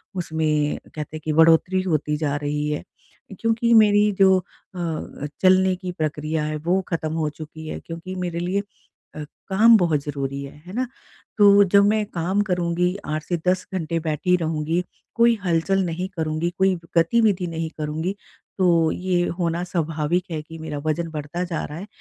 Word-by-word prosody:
उसमें 155 -4 0 0.2
कहते 155 +1 -5
हैं - - -11
कि 155 - 0
बढ़ोतरी 165 +4 +4
होती 150 -4 0
जा 145 -2 -1
रही 150 0 -2
है 150 - -3 0.6
क्योंकि 230 +1 +2
मेरी 210 -1 +5
जो 190 -1 +6
अ, 170 -5 -6
चलने 185 0 +4
की 185 -1 -5
प्रक्रिया 155 -1 -2
है 155 0 -2
वो 185 +3 +2
खत्म 160 -2 -2
हो 160 -2 0
चुकी 155 +1 -10
है - - -5
क्योंकि 170 +3 -7
मेरे 175 -1 -3
लिए 180 +3 0 0.6
अ, 150 - -5 0.2
काम 220 +4 +6
बहुत 165 -6 +2
ज़रूरी 140 -1 -4
है, 140 - -9
है 185 - -9
ना? 255 +1 0 0.5
तो 205 0 +7
जब 200 +1 +5
मैं 215 0 +2
काम 185 +1 -1
करूँगी 180 +1 0
8 155 0 -2
से 175 - -1
10 185 0 +1
घंटे 165 -2 -1
बैठी 160 +3 0
रहूँगी, 160 +1 -1 0.3
कोई 235 0 +5
हलचल 180 +3 +1
नहीं 175 +3 -3
करुँगी, 160 +1 -1
कोई 190 0 +3 0.2
गतिविधि 190 +1 +3
नहीं 165 -1 -4
करुँगी 160 +6 -2 0.4
तो 170 -3 +4
ये 180 -1 0 0.2
होना 170 0 0
स्वाभाविक 165 0 -1
है 155 - -3
कि 165 +1 -11
मेरा 160 -2 -5
वजन 165 +2 -1
बढता 155 +3 -4
जा 170 -3 -3
रहा 150 - -7
है, 195 - -7
170 Hz, 170 wpm, -23 LUFS, 155-185 Hz, 0.6 s, तो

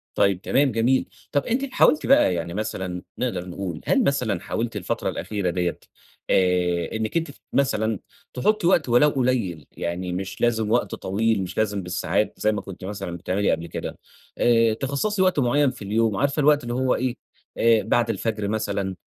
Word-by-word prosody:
طيب، 95 -2 +2
تمام 135 +4 +2
جميل. 120 +4 +2 0.3
طب 145 -1 +1
أنتِ 255 +4 0
حاولتِ 305 - +4
بقى 265 - +5
يعني 85 0 -3
مثلًا 95 -3 -3 0.2
نقدر 95 -8 -2
نقول، 90 -3 -5
هل 270 - +3
مثلًا 125 - 0
حاولتِ 115 0 -3
الفترة 100 -4 -2
الأخيرة 100 -4 -2
ديَّة 90 -1 -1 0.5
آآ، 90 -2 +2
إنِّك 110 +7 -1
أنتِ 165 -3 -2
ت - - -22
مثلًا 110 -6 +1 0.3
تحطي 200 +8 +1
وقت 170 -7 +3
ولو 120 +5 +5
قليّل، 120 - -1
يعني 90 +1 -3
مش 95 +1 -5
لازم 110 -2 +1
وقت 120 +1 +1
طويل، 105 +1 0
مش 90 - -7
لازم 100 -3 0
بالساعات 95 +3 -1
زي 110 - +2
ما 105 - -3
كنتِ 95 -1 -10
مثلًا 95 -3 -5
بتعملي 95 +4 0
قبل 85 - -2
كده، - - -6 0.4
آآ، 115 -2 +4
تِخصَّصي 140 - -1
وقت 185 -4 +3
معين 140 +2 +3
في 120 - -14
اليوم 110 +1 +1
عارفة 140 +2 0
الوقت 145 -2 +4
هو 130 +1 +1
إيه، 130 -1 -1 0.4
آآ، 115 -1 +4
بعد 120 +1 +1
الفجر 110 -2 -2
مثلًا، 100 -3 -2
110 Hz, 175 wpm, -24 LUFS, 95-130 Hz, 0.5 s, بقى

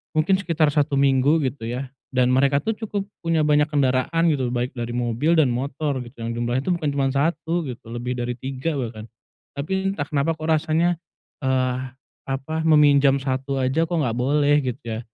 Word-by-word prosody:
mungkin 155 +5 +3
sekitar 165 -5 +1
1 145 -1 +1
minggu 140 +3 +3
gitu 125 -3 -6
ya, 125 +2 -4 0.2
dan 125 0 +3
mereka 140 +2 +3
tuh 225 - 0
cukup 210 -2 -3 0.2
punya 165 -2 +1
banyak 150 0 +3
kendaraan 145 +3 +1
gitu, 130 -4 0
baik 125 +1 -2
dari 120 0 -3
mobil 125 +7 +1
dan 150 -6 +4
motor 140 +2 -2
gitu, 120 -1 -11
yang 115 - -2
jumlahnya 120 +2 -1
itu 180 - -1
bukan 160 -4 -2
cuman 135 -1 +1
1 160 +3 0
gitu, 125 - -7
lebih 120 +1 -3
dari 125 0 -2
3 135 +3 -3
bahkan. 110 -3 -5 0.5
Tapi 190 +7 -1
entah 145 -6 -4
kenapa 145 +2 0
kok 155 - -5
rasanya, 160 +2 +2 0.5
eee, 130 -1 +1 0.5
apa, 135 +4 -3
meminjam 145 -3 +5
1 135 0 -2
aja 130 +5 +1
kok 175 - -2
enggak 125 -6 0
boleh 145 +3 +3
gitu 125 0 -3 0.2
ya. - - -5
140 Hz, 180 wpm, -23 LUFS, 130-155 Hz, 0.5 s, meminjam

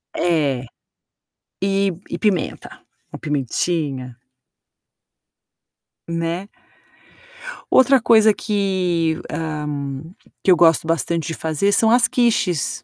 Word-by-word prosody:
É. 145 -7 0 1.0
E 195 0 +1 0.2
e - - -2
pimenta. 205 -5 -2 0.3
Uma - - -8
pimentinha. 140 -2 -2 1.9
Né. 170 +4 -3 1.2
Outra 260 0 +5
coisa 220 -2 +5
que 185 -6 -1
ah, 150 -1 -4 0.8
que 190 - +4
eu - - +7
gosto 165 -1 +4
bastante 165 +1 -1
de 165 - -3
fazer 160 +6 0
são 220 +2 +3
as 245 +1 +5
quiches. 215 - 0
170 Hz, 95 wpm, -20 LUFS, 155-200 Hz, 1.9 s, eu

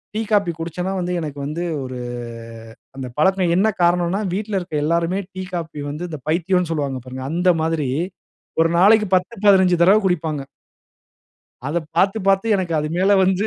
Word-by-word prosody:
Tea, 220 - 0
coffee 200 -4 +3
குடிச்சேனா 175 +3 -3
வந்து 180 0 -2
எனக்கு 145 -3 -6
வந்து 155 +4 -3 0.2
ஒரு 130 -1 -6 1.0
அந்த 130 -1 -5
பழக்கம் 185 +1 +3
என்ன 200 +4 +3 0.2
காரணம்னா 175 +3 +2
வீட்ல 205 0 -2
இருக்கிற 175 -4 -3
எல்லோருமே 170 +4 0
டீ, 185 0 -5
காஃபி 165 -3 -4
வந்து 155 +4 -5
இந்த 155 -3 -6
பைத்தியம்னு 180 +1 +1
சொல்லுவாங்க 140 -4 -2
பாருங்க, 130 +1 -7
அந்த 180 +2 +2
மாதிரி 160 -4 -1 0.7
ஒரு 165 - +3
நாளைக்கு 210 +3 +5
10, 185 +5 0
15 190 -3 +5
தடவ 195 +5 +6
குடிப்பாங்க. 160 -5 0 1.3
அத 150 +4 -2 0.2
பாத்து 195 +5 +3
பாத்து 195 +2 +3
எனக்கு 180 -4 -2
அது 150 0 -1
மேலே 195 +2 +4
வந்து 190 +3 +1
175 Hz, 160 wpm, -21 LUFS, 160-190 Hz, 1.3 s, தடவ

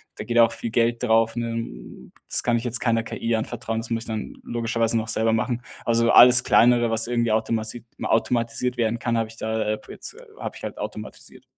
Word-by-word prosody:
da - - -6
geht 120 0 0
auch 115 0 +5
viel 115 - -5
Geld 120 +1 +1
drauf, 115 -1 +2
ne? 115 - -6 0.2
Das - - +2
kann 120 - +1
ich 115 - -4
jetzt 120 -2 +1
keiner 115 -2 +1
KI 115 0 -2
anvertrauen, 110 0 -3
das 115 - -8
muss 115 -1 -2
ich - - -13
dann 110 -2 -5
logischerweise 115 -1 -1
noch 110 0 -3
selber 110 0 +1
machen. 120 +2 -1 0.2
Also, 115 0 +2
alles 125 0 +8
kleinere, 120 0 +4
was 115 +1 0
irgendwie 120 -2 0
automati 110 +1 -2 0.2
automatisiert 120 +2 0
werden 115 0 0
kann, 115 -1 -1
habe 115 -1 0
ich 115 - -13
da 110 0 -2
äh, 110 0 0
jetzt - - -9 0.2
habe - - -6
ich - - -12
halt - - -6
automatisiert. - - -9
115 Hz, 205 wpm, -23 LUFS, 115-120 Hz, 0.2 s, alles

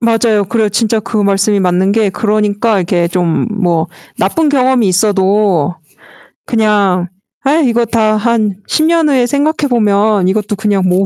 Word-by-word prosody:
맞아요, 225 -2 +1
그래요. 220 +1 0
진짜 220 +2 0
그 220 +1 -5
말씀이 200 0 +1
맞는 185 +1 +1
게 220 -1 +1
그러니까 210 +1 0
이렇게 175 -1 0
좀 175 0 -1
뭐 175 -6 -1 0.3
나쁜 300 - 0
경험이 260 -5 +2
있어도 190 -3 +1 0.7
그냥 205 -6 +1 0.4
'아 275 - +1
이거 235 -1 +1
다 220 -2 +1
한 215 -3 0
10 310 - 0
년 330 -2 +2
후에 255 -3 +2
생각해 290 +3 -1
보면 210 -4 +1
이것도 210 +2 -1
그냥 200 -3 0
뭐 185 +2 +1
210 Hz, 290 characters per minute, -13 LUFS, 190-230 Hz, 0.7 s, 경험이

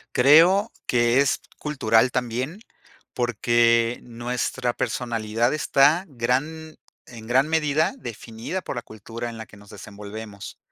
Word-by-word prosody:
Creo 165 - +6
que 120 +1 +2
es 140 - +1 0.2
cultural 125 -5 +2
también, 125 - -3 0.5
porque 120 0 +2
nuestra 120 +1 -3
personalidad 115 -1 -1
está 155 +3 +3
gran 150 +5 -2 0.3
en 115 -2 -11
gran 130 +4 +3
medida, 155 -1 +1
definida 115 - -6
por 140 - -6
la - - -2
cultura 115 +2 -8
en 115 - -8
la 110 - -7
que 105 - -17
nos 100 0 -17
desenvolvemos. 105 0 -9
120 Hz, 125 wpm, -24 LUFS, 115-140 Hz, 0.5 s, Creo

